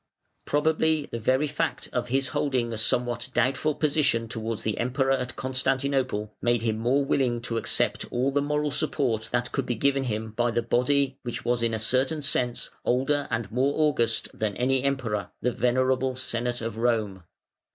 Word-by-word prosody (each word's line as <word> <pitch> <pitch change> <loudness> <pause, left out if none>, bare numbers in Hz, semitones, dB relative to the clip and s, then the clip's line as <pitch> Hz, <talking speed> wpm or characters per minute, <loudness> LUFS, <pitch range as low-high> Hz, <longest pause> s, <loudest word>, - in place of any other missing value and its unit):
Probably 155 0 +1
the 115 - -3
very 130 +6 +2
fact 150 0 -2
of 125 -1 -1
his 135 +2 0
holding 130 -4 0
a - - -3
somewhat 120 +2 0
doubtful 135 +5 +1
position 145 -7 +1
towards 115 0 -4
the 110 - -2
Emperor 135 +3 +1
at 130 -1 -1
Constantinople 130 -4 -1
made 120 -1 +1
him 110 -1 0
more 130 +5 +2
willing 125 -4 +1
to 115 -1 -2
accept - - 0
all 130 +3 +1
the 145 +1 +1
moral 150 +1 0
support 120 -5 0
that 120 0 0
could 135 -2 -2
be 120 - 0
given 135 +3 +1
him 110 -2 -3
by 120 +2 +1
the 120 0 0
body 135 +3 +1
which 120 -2 -5
was 120 0 +1
in 115 -1 +1
a - - -1
certain 130 +7 +1
sense 125 -3 0
older 140 +3 +1
and 115 -3 -2
more 130 +5 +1
august 130 -7 +2
than 105 -2 -2
any 130 +1 +2
Emperor, 125 -7 -1
the 125 - 0
venerable 130 +2 +1
Senate 120 -1 -2
of 115 -1 -4
Rome. 110 -5 0
125 Hz, 175 wpm, -26 LUFS, 115-135 Hz, -, very